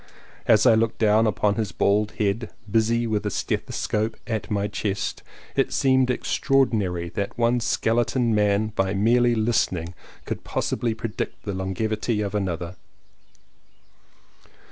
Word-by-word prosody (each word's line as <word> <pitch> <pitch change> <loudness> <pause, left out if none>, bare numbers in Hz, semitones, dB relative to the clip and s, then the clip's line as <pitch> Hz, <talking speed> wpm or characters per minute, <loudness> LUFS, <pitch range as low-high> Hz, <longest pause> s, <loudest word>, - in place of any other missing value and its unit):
As 110 -1 +5
I - - +7
looked 115 0 +1
down 110 +1 +4
upon 105 -1 +1
his 110 -3 -1
bald 105 +1 +1
head, 105 +2 -1 0.2
busy 115 +2 +2
with 110 -2 -1
a - - -1
stethoscope 110 +1 -2
at 110 -2 -3
my 100 -1 0
chest, 100 -1 -3 0.3
it - - +1
seemed 130 -1 +3
extraordinary 110 -9 +1
that 100 +3 -4
one 120 +1 +2
skeleton 115 +1 +1
man 105 0 +2
by 95 -2 -1
merely 120 +4 +3
listening 95 -7 0 0.3
could - - -5
possibly 115 -2 -1
predict 110 -1 -5
the 100 - -3
longevity 105 +4 -2
of 100 -1 -3
another. 90 -3 -3
110 Hz, 130 wpm, -24 LUFS, 100-115 Hz, 0.3 s, I